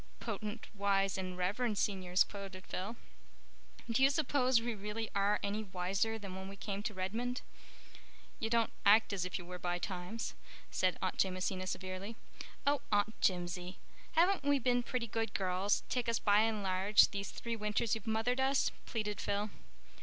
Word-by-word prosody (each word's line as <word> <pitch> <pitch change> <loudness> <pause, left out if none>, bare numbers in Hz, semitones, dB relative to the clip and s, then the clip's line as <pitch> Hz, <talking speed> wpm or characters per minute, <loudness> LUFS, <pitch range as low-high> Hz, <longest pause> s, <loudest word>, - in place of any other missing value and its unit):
"'Potent, 215 0 -4
wise, 195 -1 +2
and 185 -1 -4
reverend 210 +5 0
Seniors,'" 185 -3 +2
quoted 195 -2 -8
Phil. 200 +6 -4 0.9
"Do 235 +2 +1
you 270 - +7
suppose 270 -4 +3
we 235 +1 -2
really 210 +2 -4
are 200 +1 +2
any 205 +2 -1
wiser 195 +3 -1
than 200 -3 -7
when 190 0 -6
we 195 - -8
came 200 0 -4
to 210 - -3
Redmond?" 230 +7 -2 1.0
"You 225 - -1
don't 230 -1 +2
act 210 +1 +6
as 185 -2 -1
if 185 - -2
you 175 - -8
were 180 0 -7
by 175 0 -1
times," 185 +5 -4 0.4
said 185 -1 +1
Aunt 185 - -1
Jamesina 185 0 -2
severely. 185 +4 -4 0.5
"Oh, 285 0 +3
Aunt 205 +1 +1
Jimsie, 180 0 0 0.4
haven't 350 0 +4
we 285 0 +4
been 245 -1 +2
pretty 245 0 -2
good 225 0 -2
girls, 190 +1 +1
take 245 -2 0
us 230 - +2
by 205 -2 +4
and 220 -2 +2
large, 190 +2 +5
these 200 -1 -3
three 235 -1 -4
winters 210 +1 0
you've 225 0 -3
mothered 225 +3 +1
us?" 270 +1 +3 0.2
pleaded 210 -6 -2
Phil. 205 +1 -1
205 Hz, 170 wpm, -35 LUFS, 190-230 Hz, 1.0 s, you